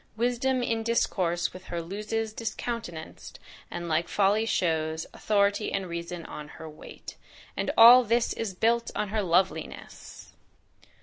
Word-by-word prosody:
Wisdom 245 +2 +1
in 225 -1 0
discourse 185 -7 0
with 185 0 -11
her 170 - -4
Loses 210 +5 -3
discountenanc'd, 225 -6 -6 0.3
and 175 0 -5
like 170 +1 0
folly 205 +3 +2
shows; 160 -4 0
Authority 205 0 +1
and 195 -1 -2
reason 170 0 -6
on 150 - -8
her 160 - -8
wait." 155 -1 -11 0.4
And - - -2
all 240 +2 +10
this 235 +1 +1
is 210 -5 -4
built 230 +4 +1
on 210 - -1
her 215 +1 0
loveliness! 170 -3 -2
200 Hz, 135 wpm, -27 LUFS, 170-225 Hz, 0.4 s, all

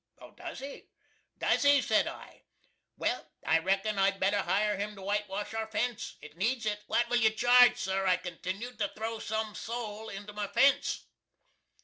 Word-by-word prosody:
"Does - - -8
he? 275 +1 -8 0.5
does - - +2
he?" 285 0 +6
said 220 -4 +2
I - - -9 0.6
"well, - - -1 0.2
I 165 - +4
reckon 195 +4 0
I'd 195 0 +2
better 200 +2 +2
hire 205 +4 +1
him 205 +1 -4
to 195 - -11
whitewash 205 +1 -2
our 225 0 -2
fence. 220 +2 -2
It 150 - -11
needs 230 +5 0
it. 210 -1 -1
What 235 0 +2
will 245 0 +2
you 225 -2 +5
charge, 245 +3 +6
sir," 190 0 -1
I 180 -1 +4
continued, 185 +7 -6
"to 205 - +1
throw 225 +1 -4
some 220 0 -2
soul 220 -1 -5
into 205 +1 -8
my 210 -1 -3
fence?" 275 +6 +2
210 Hz, 170 wpm, -30 LUFS, 195-230 Hz, 0.6 s, he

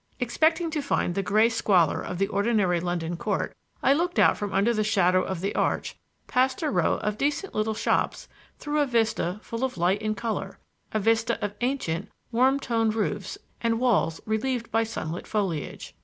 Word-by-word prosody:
Expecting 320 +7 +1
to 305 -1 -1
find 275 -9 0
the 195 - 0
gray 215 +4 +4
squalor 200 -8 +2
of 180 - -5
the 195 - +2
ordinary 200 -3 +1
London 175 -1 -2
court, 205 +2 -2 0.3
I 270 - +5
looked 345 +4 -1
out - - +5
from 205 -1 -4
under 200 +5 +2
the 215 -1 +1
shadow 185 -4 +3
of 185 -2 -4
the 200 +2 -1
arch - - -1 0.3
past 260 +4 +1
a 300 - +1
row - - +2
of 210 0 -2
decent 295 +7 -1
little 215 +1 0
shops - - 0 0.3
through 295 0 -2
a 290 - +2
vista 225 -6 0
full 230 +2 -5
of 260 -7 -1
light 180 +4 +2
and 215 0 -2
color 230 -2 -3 0.3
a 215 - 0
vista 225 +2 +2
of 205 - -4
ancient, 245 -11 -1 0.2
warm 260 +4 +3
toned 225 -4 0
roofs 220 - -2 0.2
and 230 -1 +1
walls 215 -10 +2
relieved 230 +2 -1
by 225 - +3
sunlit 175 -7 -5
foliage. 190 -8 -3
220 Hz, 185 wpm, -26 LUFS, 195-250 Hz, 0.3 s, I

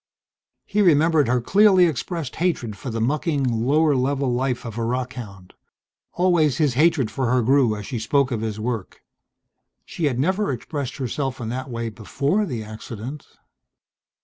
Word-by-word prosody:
He 210 +1 0
remembered 160 - +4
her 125 +1 +2
clearly 190 - +5
expressed 160 -2 -3
hatred 160 - -1
for 125 - -7
the 115 -1 -3
mucking, 145 +4 0
lower 135 +6 +2
level 135 0 0
life 125 0 -1
of 115 0 -6
a - - -1
rockhound. 120 -6 -5 0.6
Always 170 -7 +2
his 150 -5 +2
hatred 140 -3 +2
for 130 -4 -1
her 125 0 +2
grew 130 -2 +3
as 105 -1 -7
she 120 - -4
spoke 135 +4 +1
of 115 -3 -2
his 110 -1 -3
work.... 110 -3 -4 0.8
She 165 - -3
had 135 -5 0
never 190 +5 +1
expressed 135 +2 -5
herself 135 0 -3
in 115 -2 -4
that 130 +2 -4
way 115 -1 -3
before 140 - -1
the 120 -7 -4
accident. 110 +5 -8
130 Hz, 160 wpm, -23 LUFS, 115-150 Hz, 0.8 s, clearly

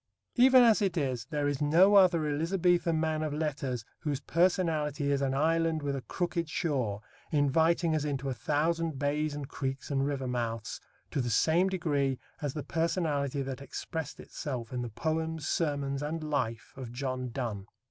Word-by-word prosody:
Even 255 0 +7
as 225 -2 +5
it 190 -4 0
is, 130 -7 -1
there 145 -1 -1
is 145 -1 -1
no 170 +7 +5
other 180 -5 +6
Elizabethan 170 +2 +1
man 155 -1 0
of 155 -2 -2
letters 140 -7 -2
whose 145 -3 -2
personality 155 -3 +1
is 140 -1 +1
an 135 -1 0
island 160 +1 +1
with 140 -1 -1
a 135 - -3
crooked 175 +2 -2
shore, 125 -11 -1 0.3
inviting 160 +3 +3
us 155 - 0
into 140 -2 -2
a 135 - 0
thousand 160 +3 0
bays 145 +2 0
and 145 -2 -5
creeks 135 0 -4
and 135 0 +1
river 140 -2 -2
mouths, 115 -3 -3 0.3
to 140 - 0
the 120 - -2
same 165 - +3
degree 145 -8 0 0.2
as 145 -3 -3
the 150 - -3
personality 150 -4 0
that 135 0 -5
expressed 155 +3 -5
itself 125 -5 -5
in 125 - -2
the 120 - -4
poems, 160 +5 -2
sermons, 140 -3 -1
and 155 +2 -3
life 115 -7 -2
of 130 -4 -7
John 130 0 -3
Donne. 115 -5 -4
145 Hz, 170 wpm, -30 LUFS, 135-165 Hz, 0.3 s, Even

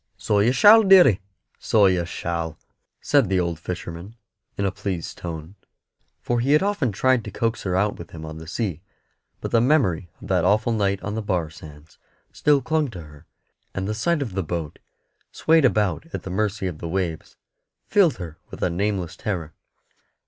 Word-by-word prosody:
"So 105 - +1
you 110 +4 +4
shall, 205 - +8
deary, 185 - +6 0.4
so 105 -2 +3
you 90 -2 +2
shall," 85 -2 -4 0.4
said - - +3
the 95 -1 +2
old 85 -2 -2
fisherman, 85 +4 -7 0.4
in 100 - 0
a 95 - +1
pleased 95 -4 -5
tone, 80 0 -7 0.7
for 120 0 0
he 135 +5 +2
had 150 - +4
often 200 - 0
tried 130 +4 +2
to - - -7
coax 115 +3 -2
her 90 -2 -2
out 100 +2 0
with 85 - -9
him 80 -1 -9
on 80 0 -8
the 80 - -10
sea; 90 -2 -3 0.6
but - - -4
the 115 - +4
memory 115 - +2
of - - -10
that 90 -3 +2
awful 110 +5 +2
night 100 -3 0
on 100 - -3
the 110 - -2
bar 90 -6 -2
sands 75 -1 -14 0.3
still 145 -3 +2
clung 155 0 0
to 95 -7 -8
her, 75 +1 -16 0.5
and 95 0 -2
the 105 - -1
sight 145 +8 0
of 115 -8 -7
the 95 - -1
boat, 80 -3 -5 0.5
swayed 160 -2 +3
about 105 - +1
at - - -4
the 95 - -6
mercy 105 0 -1
of 90 -5 -4
the 85 - -5
waves, 85 -3 -3 0.5
filled 185 -8 +3
her 85 -3 -8
with - - -7
a 90 - +1
nameless 95 -1 -2
terror. 85 -7 -4
95 Hz, 190 wpm, -23 LUFS, 85-115 Hz, 0.7 s, shall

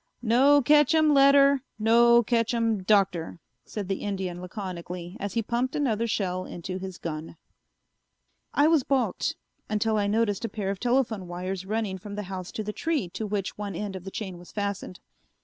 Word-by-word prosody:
"No 270 +5 +5
ketchum 300 +2 +5
letter, 275 0 +6 0.2
no 235 +2 +5
ketchum 230 -2 +1
Doctor," 185 -4 +1 0.3
said 205 -3 -5
the 195 0 -2
Indian 190 -3 -3
laconically 180 -1 -6
as 200 -1 -4
he 230 - +1
pumped 245 +4 -1
another 230 -6 0
shell 185 -4 -1
into 185 +2 -6
his 190 -1 -7
gun. 160 0 -6 1.1
I 290 - +3
was 320 -2 +5
balked, 255 -7 0 0.3
until 215 +1 +1
I 205 -1 +1
noticed 210 -1 +1
a 230 - -2
pair 200 -2 -3
of 195 - -5
telephone 240 -6 0
wires 185 +2 -5
running 210 -3 -2
from 200 +2 -8
the 210 - -4
house 185 -1 -6
to 215 - -3
the 210 0 -4
tree 300 - -1
to 215 +5 -5
which 200 -1 -3
one 200 -3 -4
end 200 +1 -4
of 185 - -7
the 195 - -6
chain 190 -3 -6
was 175 - -14
fastened. 200 -3 -4
210 Hz, 175 wpm, -27 LUFS, 185-235 Hz, 1.1 s, letter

